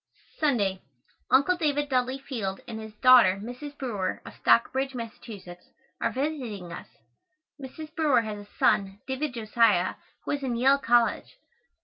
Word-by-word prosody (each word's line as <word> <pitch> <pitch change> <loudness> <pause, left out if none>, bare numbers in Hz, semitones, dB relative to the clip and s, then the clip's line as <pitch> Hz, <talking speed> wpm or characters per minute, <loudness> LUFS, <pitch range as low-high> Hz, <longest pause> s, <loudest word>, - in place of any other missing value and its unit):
Sunday. 205 - +1 0.5
Uncle 280 +8 +4
David 290 -4 0
Dudley 255 -1 0
Field 230 -9 -4
and 225 -2 -6
his 220 -1 -10
daughter, 240 -7 +7
Mrs. 250 +7 -8
Brewer, 215 -9 -3
of - - -9
Stockbridge, 265 +3 +2
Mass., 230 -2 -5
are 180 -5 -7
visiting 250 - -4
us. - - -9 0.7
Mrs. 305 +4 -9
Brewer 300 -7 +3
has 210 -2 -7
a - - -27
son, 195 0 +2
David 265 0 -3
Josiah, 215 -5 +2 0.3
who - - -2
is 285 - -1
in 255 -3 -2
Yale 270 +4 +4
College. 240 - +1
245 Hz, 140 wpm, -27 LUFS, 210-275 Hz, 0.7 s, daughter